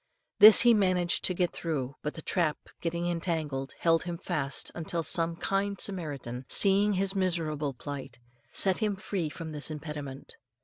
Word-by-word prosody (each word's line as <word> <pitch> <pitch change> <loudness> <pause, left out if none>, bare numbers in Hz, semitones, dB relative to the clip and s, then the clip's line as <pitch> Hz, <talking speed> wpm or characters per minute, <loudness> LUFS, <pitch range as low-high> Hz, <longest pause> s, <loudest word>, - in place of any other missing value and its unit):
This 215 +1 +10
he 240 -1 +6
managed 185 -4 +2
to 185 - -1
get 175 -1 0
through, 140 -5 -4
but 150 - -4
the 160 - -9
trap 165 -4 0 0.2
getting 170 0 -2
entangled, 160 -6 -3
held 165 -1 +2
him 175 -1 -5
fast 155 -6 -2
until 170 0 -2
some 165 +2 0
kind 195 +3 -2
Samaritan, 140 -10 -2
seeing 200 +1 +3
his 195 +1 +1
miserable 155 -7 -1
plight, 135 -2 -8 0.3
set 190 -2 +2
him 210 -3 0
free 190 -4 -3
from 160 +1 -8
this 150 0 -2
impediment. 150 -3 -7
165 Hz, 160 wpm, -29 LUFS, 150-185 Hz, 0.3 s, This